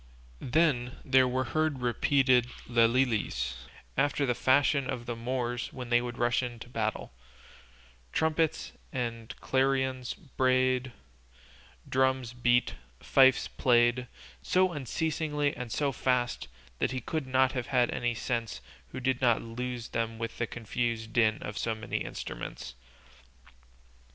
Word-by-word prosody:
Then 125 -3 +1
there 130 -1 +5
were 130 +1 0
heard 150 +1 -1
repeated 125 +1 +3 0.2
lelilies 115 - +1 0.3
after 140 +1 +1
the 125 - +1
fashion 135 +1 +2
of 120 -1 -4
the 120 0 -3
Moors 120 0 -3
when 125 -2 -7
they 120 0 +4
rush 120 0 0
to 120 -2 -5
battle; 110 - -3 1.0
trumpets 160 0 0 0.2
and 115 -3 -4
clarions 130 -1 0
brayed, 130 -5 +1 1.0
drums 130 -2 +1
beat, 120 0 +2 0.3
fifes 130 -1 +4
played, 120 0 +2 0.3
so 185 - +2
unceasingly 150 0 -1
and 125 -2 -6
so 140 +4 0
fast 125 - 0 0.3
that - - +1
he 130 - -3
could 155 +3 -3
not 130 0 +3
have 125 -3 -3
had 125 -3 +2
any 120 -1 -1
senses 115 -2 -3 0.3
who - - -7
did 130 0 0
not 120 -3 +4
lose 120 0 -5
them 115 0 -2
with 115 0 -5
the 115 - 0
confused 115 -1 -3
din 110 -2 +3
of 105 0 -5
so 115 -1 -1
many 110 - -3
instruments. 70 - -6
125 Hz, 125 wpm, -29 LUFS, 120-130 Hz, 1.0 s, there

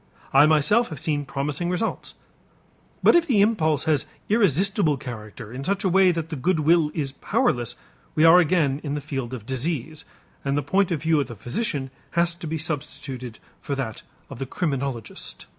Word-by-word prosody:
I 140 +3 +7
myself 160 +10 +3
have 155 - -7
seen 150 -3 -1
promising 145 +5 -2
results. 200 +5 -2 0.9
But - - +7
if 340 -1 +4
the 240 -8 +3
impulse 160 -9 +2
has 155 -4 +1 0.2
irresistible 195 - +3
character 115 -3 -8
in 130 +2 -5
such 195 +5 -1
a 190 - +2
way 185 0 +5
that 165 -2 -3
the 160 - -4
good 160 +4 +1
will 160 0 +4
is 140 -4 -2
powerless, 120 -3 0 0.4
we 155 - +3
are 165 +2 +8
again 155 -5 +2
in 145 -2 -2
the - - -2
field 135 -4 -5
of 120 -5 -7
disease 150 +3 -3 0.4
and 140 0 0
the 145 - 0
point 190 +7 +2
of 160 -4 -2
view 160 -1 +3
of 140 - -1
the 120 - -8
physician 135 - -3 0.3
has 170 0 +3
to 170 -1 -8
be 160 +1 -2
substituted 135 -6 -5 0.2
for 140 - -3
that 125 -5 -4 0.3
of 135 -4 -10
the 135 - -4
criminologist. 135 - -3
150 Hz, 185 wpm, -24 LUFS, 135-175 Hz, 0.9 s, are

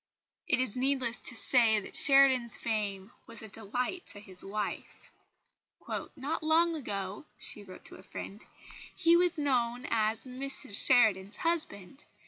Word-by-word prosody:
It - - +2
is 255 -5 -1
needless 255 -2 0
to 255 - -1
say 225 -4 +4
that 195 - -10
Sheridan's 270 -4 +5
fame 205 -2 -3 0.2
was 230 -1 -9
a - - -8
delight 245 - -4
to 205 - -9
his 190 -3 -7
wife. 205 +1 -5 1.0
"Not 290 +3 -3
long 325 +2 +3
ago," 205 -2 -5
she 210 - -4
wrote 185 -2 -13
to - - -11
a - - -13
friend, 200 +2 -8 0.5
"he 335 0 +4
was 350 -1 +2
known 250 -4 0
as 220 -1 +1
'Mrs 260 -3 -3
Sheridan's 215 -6 +3
husband.' 295 - -3
240 Hz, 140 wpm, -30 LUFS, 205-275 Hz, 1.0 s, Sheridan's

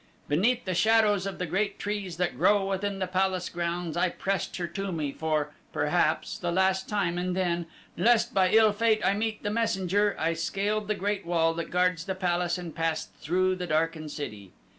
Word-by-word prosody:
"Beneath 220 +12 +2
the 185 - -1
shadows 210 0 +3
of 195 - -5
the 180 - -2
great 195 +4 -1
trees 200 -4 -4
that 180 0 -1
grow 205 -1 +3
within 195 +1 -2
the 190 - -1
palace 185 0 0
grounds 170 -1 -3
I 175 +1 +2
pressed 195 +2 -2
her 175 - -2
to 195 +3 -4
me 155 -4 -2
for, 150 -1 -1 0.2
perhaps, - - 0
the 175 - -1
last 190 +1 +1
time 195 -5 0
and 180 0 -1
then, 175 -2 0 0.3
lest 230 +4 +3
by 190 -1 +4
ill 220 0 +5
fate 220 0 +2
I - - +4
meet 215 +1 -2
the 205 - -1
messenger, 205 -2 +1
I 165 +1 +1
scaled 200 +5 -1
the 215 - 0
great 200 +1 -2
wall 165 -1 +2
that 170 0 -4
guards 180 -1 +1
the 190 -1 -3
palace 175 -2 0
and 175 -3 -7
passed 165 -1 -2
through 185 +3 +1
the 180 -1 -4
darkened 155 0 0
city. 105 -11 -7
185 Hz, 195 wpm, -28 LUFS, 170-200 Hz, 0.3 s, ill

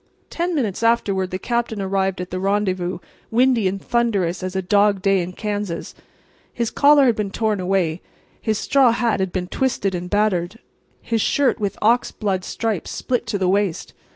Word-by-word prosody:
Ten 345 0 -1
minutes 225 -10 -1
afterward 200 -5 +1
the 185 - -3
Captain 235 +1 -2
arrived 195 -1 -1
at 180 0 -6
the 185 - -3
rendezvous, 190 -2 0 0.3
windy 240 -3 +3
and 195 +1 -2
thunderous 200 -7 0
as 185 0 -4
a 190 - 0
dog 200 0 +2
day 195 -1 +3
in 175 +1 -4
Kansas. 205 -4 -4 0.6
His 235 -2 -2
collar 285 -1 +5
had 240 -3 +3
been 210 -2 -2
torn 215 0 -1
away; 180 -3 0 0.4
his 220 -2 0
straw 265 -1 +3
hat 230 -4 0
had 190 -1 -1
been 180 -1 -2
twisted 235 -4 -1
and 180 0 -4
battered; 205 -2 0 0.5
his 225 -1 0
shirt 275 +1 +2
with 200 -2 -2
ox 235 +3 +3
blood 195 -4 -2
stripes 220 -3 -3
split 245 -2 -2
to 210 - -1
the 190 -2 0
waist. 195 -2 0
200 Hz, 180 wpm, -21 LUFS, 185-230 Hz, 0.6 s, collar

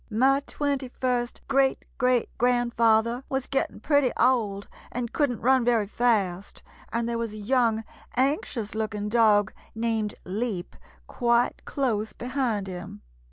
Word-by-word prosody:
My 260 +5 +3
twenty 280 -2 -1
first 245 -2 -1
great 270 -1 +2
great 250 -2 +1
grandfather 235 0 +2
was 265 -1 -1
getting 270 -5 -2
pretty 285 +1 +2
old 220 -5 +2 0.2
and 240 -1 -4
couldn't 265 -6 0
run 260 +1 +4
very 230 -3 +2
fast, 200 -4 0 0.3
and 235 0 -1
there 235 0 -2
was 230 -2 -3
a - - -7
young, 225 0 +1 0.3
anxious 255 -4 0
looking 215 -1 -3
dog 210 -3 +4 0.2
named 225 -2 -1
Leap 195 -1 -3 0.3
quite 240 -1 +1
close 220 -6 -1
behind 245 -5 -2
him. 180 - -8
235 Hz, 130 wpm, -26 LUFS, 215-255 Hz, 0.3 s, run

